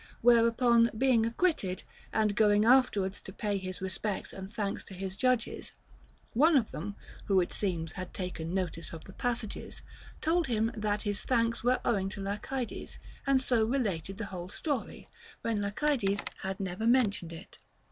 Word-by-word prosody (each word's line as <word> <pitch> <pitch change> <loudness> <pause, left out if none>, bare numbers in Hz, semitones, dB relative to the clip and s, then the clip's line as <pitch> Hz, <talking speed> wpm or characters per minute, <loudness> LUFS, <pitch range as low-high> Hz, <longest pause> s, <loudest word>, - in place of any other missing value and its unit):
Whereupon 235 0 +5
being 240 -3 +4
acquitted, 230 - 0 0.3
and 215 -2 +2
going 210 -1 +4
afterwards 230 -6 +4
to - - -9
pay 205 0 -1
his 185 -1 -6
respects 190 +2 -2
and 190 0 -7
thanks 205 -2 -2
to 190 - -10
his 190 0 -4
judges, 255 0 0 0.6
one 300 +6 +5
of 230 -5 +1
them 200 +6 -5 0.3
(who, 195 -2 +4
it 175 - 0
seems, 170 -5 -1
had 185 +2 -6
taken 180 -3 -4
notice 175 -3 -3
of 160 - -8
the 195 - -12
passages) 235 -2 -3 0.4
told 330 0 +2
him 225 -2 +1
that 210 -1 -1
his 205 -1 -1
thanks 235 -2 +1
were 250 +1 +3
owing 195 -5 +1
to 200 - -8
Lacydes, 210 +5 -4 0.3
and 265 -1 +4
so 240 -3 +3
related 200 -7 -1
the 215 - -3
whole 180 0 -5
story, 280 - -3 0.4
when 230 -2 0
yet 200 0 -3
Lacydes 235 -10 +1 0.2
had 190 +1 -3
never 195 +3 -2
mentioned 215 -9 +3
it. 165 +3 -11
210 Hz, 165 wpm, -31 LUFS, 190-240 Hz, 0.6 s, Whereupon